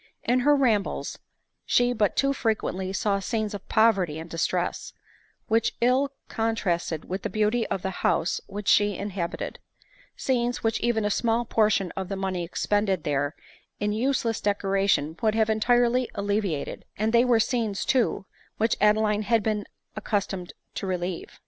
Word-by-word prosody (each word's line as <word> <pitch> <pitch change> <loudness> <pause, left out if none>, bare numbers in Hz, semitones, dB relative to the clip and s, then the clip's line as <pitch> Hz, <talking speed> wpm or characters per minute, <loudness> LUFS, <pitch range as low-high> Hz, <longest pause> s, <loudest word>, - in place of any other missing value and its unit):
In 250 +1 +2
her 290 +3 +4
rambles 230 -8 0 0.4
she 245 0 +3
but 210 -4 +1
too 275 0 +2
frequently 205 -6 -1
saw 200 +1 0
scenes 215 +1 -2
of 200 -1 -8
poverty 195 -8 +3
and 160 +1 -7
distress, 165 -1 -2 0.5
which 225 +1 +1
ill 255 +4 +3 0.2
contrasted 185 -8 -1
with 190 +2 -4
the - - -3
beauty 215 +2 +1
of 190 - -3
the 190 - -1
house 165 - +1
which 205 0 -7
she 205 -2 +4
inhabited; 190 -4 -4 0.6
scenes, 245 -2 0
which 225 -1 +1
even 225 -2 +1
a 205 - +1
small 230 +2 +1
portion 210 -5 +2
of 190 -1 -4
the 195 - -2
money 190 -2 -2
expended 195 0 0
there 145 +1 -1 0.4
m 205 0 0
useless 230 0 0
decoration 195 -6 +1
would 220 -2 +2
have 220 -1 +2
entirely 240 +3 +2
alleviated; 200 -6 -2
and 220 +2 0
they 235 0 +6
were 245 -2 +4
scenes 225 -4 0
too, 245 -6 +1 0.3
which 225 +1 +2
Adeline 210 0 +3
had 225 0 +2
been 210 -1 -1 0.3
accustom 205 -3 -2
ed 175 - -11 0.2
to 195 - -4
relieve. 180 -1 -4
210 Hz, 155 wpm, -26 LUFS, 195-230 Hz, 0.6 s, they